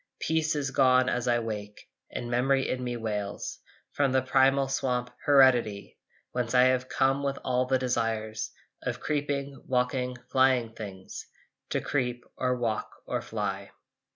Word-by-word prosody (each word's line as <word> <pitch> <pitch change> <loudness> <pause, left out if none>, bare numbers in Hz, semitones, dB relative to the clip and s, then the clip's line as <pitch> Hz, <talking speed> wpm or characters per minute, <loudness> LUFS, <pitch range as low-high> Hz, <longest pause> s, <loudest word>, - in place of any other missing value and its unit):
Peace 160 -1 +1
is 140 -3 -1
gone 130 -1 +4
as 125 0 -1
I 120 -1 +4
wake 105 -3 -5 0.2
And 120 - -5
memory 135 +2 +2
in 125 0 -2
me 120 -1 -2
wails 105 -3 -4 0.3
From 140 -2 +1
the 130 -1 +2
primal 135 +1 +3
swamp, 125 -2 -1
Heredity, 125 -7 +4 0.3
Whence 125 0 -1
I 125 - +7
have 130 0 +2
come 135 +1 +2
with 140 -1 -1
all 125 0 +1
the 130 0 +3
desires 115 -3 -1 0.3
Of - - -3
creeping, 140 -2 -2
walking, 125 0 0
flying 130 -3 +3
things, 95 -4 -8 0.4
To - - 0
creep 125 -3 -2
or 125 -1 0
walk 115 -3 -1 0.2
or - - -2
fly. - - -4
125 Hz, 150 wpm, -28 LUFS, 120-135 Hz, 0.4 s, I